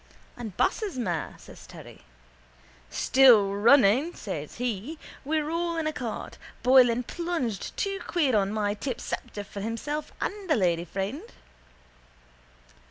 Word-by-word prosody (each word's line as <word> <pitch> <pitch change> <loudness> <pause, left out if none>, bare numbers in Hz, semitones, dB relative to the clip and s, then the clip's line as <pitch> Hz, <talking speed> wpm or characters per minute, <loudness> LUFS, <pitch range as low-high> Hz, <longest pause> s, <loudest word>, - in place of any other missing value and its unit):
—And 220 -6 -8
Bass's 410 - 0
mare? 175 -10 -2
says - - -14
Terry. - - -12 0.9
—Still 235 -7 +5
running, 240 - +4
says 155 -8 -6
he. 245 +5 -3 0.3
We're 305 +1 -1
all 335 0 -1
in 325 - -1
a 310 - -1
cart. 240 -6 -6 0.2
Boylan 250 -1 +5
plunged 330 - -3
two 395 -1 -1
quid 305 -7 +1
on 200 -2 +2
my 210 -1 0
tip 240 +3 -4
Sceptre 220 -5 -5
for 200 0 -8
himself 260 +8 -4
and 400 -3 -4
a 310 - +4
lady 175 -5 +1
friend. 195 - -4
245 Hz, 130 wpm, -27 LUFS, 205-310 Hz, 0.9 s, Still